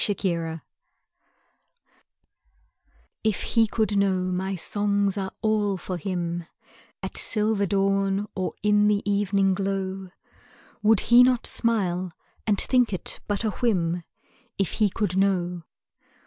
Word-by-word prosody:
Roundel 170 -5 -2 2.6
If 220 -3 0
he 225 -1 +2
could 215 -2 0
know 185 -2 +1
my 190 +2 -2
songs 200 +2 +1
are 190 -2 -3
all 210 -3 +1
for 180 0 -5
him, 175 -1 -3 0.6
At - - -2
silver 210 -2 +1
dawn 195 +1 +1
or 185 -1 -3
in 210 0 +4
the 205 -1 +1
evening 200 -1 +2
glow, 190 0 -3 0.7
Would 215 -1 +4
he 240 +1 +6
not 250 -1 +3
smile 185 -6 +1 0.3
and 205 -2 +2
think 250 -3 +3
it 185 - -5
but 205 +1 -1
a 215 - 0
whim, 180 -7 0 0.6
If 195 -3 0
he 215 -2 +2
could 195 -2 -2
know? 180 -3 +1
195 Hz, 120 wpm, -25 LUFS, 185-210 Hz, 2.6 s, he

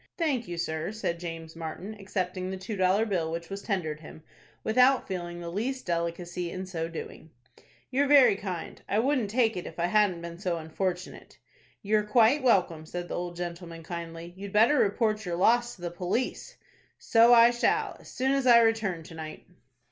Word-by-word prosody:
"Thank 280 -9 0
you, 175 -1 -5
sir," 160 +1 -2
said 195 -6 -3
James 165 -2 -7
Martin, 165 +6 -6
accepting 185 -2 -3
the 190 - -4
two 190 +3 -5
dollar 190 +3 +3
bill 175 -7 -1
which 170 +2 -5
was 195 0 -5
tendered 170 -8 -2
him, 160 0 -12 0.4
without 250 +4 +4
feeling 175 -2 -5
the 170 -1 -6
least 255 +8 -3
delicacy 170 +1 -2
in 185 +2 -5
so 165 -3 -4
doing. 165 -1 -8 0.6
"You're 280 +2 +2
very 275 -7 +7
kind. 185 -4 -6
I 205 - +1
wouldn't 250 -2 +1
take 225 0 +2
it 180 - -5
if - - -10
I 170 - +1
hadn't 185 -3 +2
been 170 0 -7
so 180 -3 -1
unfortunate." 180 +3 -4 0.5
"You're 210 +1 +2
quite 230 +6 +4
welcome," 175 -10 +2
said 175 +1 -5
the - - -3
old 175 0 -4
gentleman, 170 -1 -6
kindly. 170 0 -7
"You'd 200 +1 -8
better 235 +7 +5
report 215 +1 +1
your 175 -3 -3
loss 240 +6 +3
to 180 - -19
the 175 - -3
police." 185 +8 -3 0.4
"So 230 +1 +5
I 235 0 +8
shall, 430 - 0
as - - -14
soon 265 +1 0
as 275 -1 +1
I 240 -1 +9
return 220 -7 +1
to 160 - -12
night." 155 -1 -8
185 Hz, 185 wpm, -28 LUFS, 170-225 Hz, 0.6 s, I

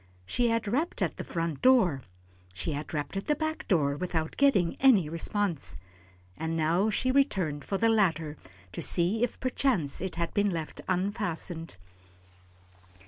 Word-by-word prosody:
She 240 - +1
had 230 -1 0
rapped 285 - 0
at - - -2
the - - -4
front 165 -4 -3
door, 210 - +4 0.5
she 100 - -2
had 145 +1 -5
rapped 150 +4 -3
at 195 - -4
the 295 - +3
back 315 +1 -3
door 145 -7 +2
without 160 -1 -2
getting 225 -12 +3
any 230 - +5
response, 170 +1 -2 0.6
and 160 0 -3
now 170 +7 +2
she 255 +4 +1
returned 190 - +1
to 195 - 0
the 230 - +3
latter 165 -9 +2 0.4
to - - -5
see 190 +7 +2
if 245 - -2
perchance 245 - 0
it 190 -2 -4
had 170 0 -2
been 205 -1 +2
left 165 -4 -4
unfastened. 180 - -2
185 Hz, 155 wpm, -29 LUFS, 160-230 Hz, 0.6 s, any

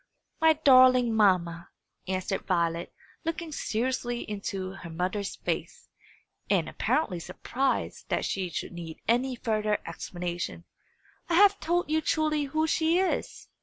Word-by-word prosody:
"My 320 -1 +6
darling 255 -5 +6
mamma," 175 -5 +2 0.4
answered 185 +1 -2
Violet, 170 -2 0 0.3
looking 330 0 -3
seriously 240 -1 -2
into 195 -2 -4
her 190 -3 -9
mother's 185 +5 -2
face, - - -4 0.6
and - - +2
apparently 205 - 0
surprised 255 +10 -2
that - - 0
she 190 -2 -2
should 165 - -4
need 170 -2 -8
any 250 +3 +2
further 215 -3 0
explanation, 175 0 -5 0.6
"I 335 - +2
have 400 +2 +6
told 345 -1 0
you 315 0 +2
truly 305 -1 +1
who 310 +3 0
she 320 +1 +2
is. 375 0 -1
225 Hz, 130 wpm, -28 LUFS, 185-305 Hz, 0.6 s, My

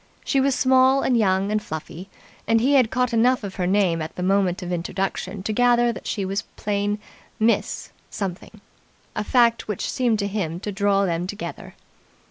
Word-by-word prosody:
She 275 - +2
was 270 -1 +2
small 260 +1 +4
and 255 - +2
young 195 -2 +2
and 215 0 +1
fluffy, 170 +1 -7 0.4
and 225 0 +4
he 265 +5 +2
had 255 -5 +5
caught 250 -1 0
enough 245 +2 +3
of 195 -1 -6
her 180 -2 0
name 185 -4 +2
at 155 - -6
the 180 - -4
moment 190 -1 +1
of 180 - -5
introduction 185 +2 -3
to 215 - -2
gather 240 0 +3
that - - -9
she 200 -3 -2
was 195 +2 -2
plain 205 0 -1 0.4
"Miss" 225 +1 0 0.2
Something 190 -3 -6 0.5
a 210 - -1
fact 235 0 +2
which 210 -3 -3
seemed 240 -4 +1
to 200 -1 -1
him 185 -5 -3
to 210 - -4
draw 200 0 +2
them 175 0 -1
together. 205 +2 -7
205 Hz, 185 wpm, -23 LUFS, 190-235 Hz, 0.5 s, had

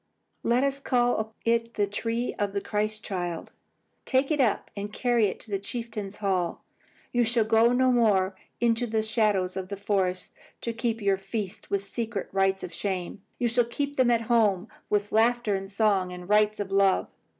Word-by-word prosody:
Let 240 +3 +2
us 275 0 0
call 240 -4 +1
it 230 0 +1
the 205 - +2
tree 230 +4 -2
of 205 -1 0
the 200 - 0
Christ 215 +1 -2
child. 175 -4 -4 0.5
Take 265 +3 +1
it 295 -2 +2
up 230 -5 +1
and 205 0 -5
carry 240 -1 +2
it 190 - -5
to 215 - -13
the 195 - 0
chieftain's 210 -2 -4
hall. 185 -4 -1 0.5
You 240 0 +3
shall 235 0 +2
go 225 +2 +4
no 255 +1 +3
more 200 -6 +3 0.2
into 235 0 +2
the 220 -1 0
shadows 210 -4 +1
of 190 -1 -4
the 200 - -4
forest 190 -2 -1 0.3
to 235 - -3
keep 230 -1 -2
your 195 -1 +3
feasts 195 +1 -5
with 200 -1 0
secret 220 0 -3
rites 195 0 +1
of 175 - -6
shame. 190 -1 -3 0.2
You 245 - +1
shall 240 +1 +2
keep 285 +4 -3
them 255 -2 +4
at 235 -1 +3
home, 220 -4 +2 0.2
with 205 0 0
laughter 230 0 +3
and 195 0 -3
song 200 -3 +2
and 180 0 -8
rites 210 +1 +3
of 200 -1 -3
love. 195 -1 +3
215 Hz, 185 wpm, -27 LUFS, 195-235 Hz, 0.5 s, go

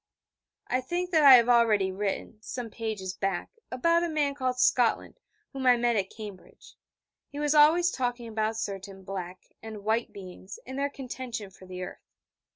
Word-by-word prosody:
I 255 - 0
think 350 +7 -3
that 320 -3 +4
I 275 -2 +11
have 235 -1 +5
already 225 -5 +4
written, 205 +2 -4
some 235 0 -6
pages 210 -5 -4
back, 195 -3 -2 0.2
about 335 +7 +2
a 345 - -1
man 295 -3 0
called 255 -2 -2
Scotland, 245 - +2 0.3
whom 265 -1 -2
I 245 -1 +6
met 240 0 +1
at 195 -2 0
Cambridge. 210 -4 -11 0.6
He 285 - -10
was 295 0 +1
always 320 +4 +5
talking 245 -2 -3
about 220 0 -2
certain 195 -2 -6
'Black' 185 -1 -7
and 220 -2 -8
'White' 220 +2 0
beings, 190 0 -10
and 260 +2 -6
their 280 0 0
contention 250 -6 -7
for 185 0 -16
the 185 0 -6
earth. - - -10
235 Hz, 170 wpm, -28 LUFS, 200-265 Hz, 0.6 s, I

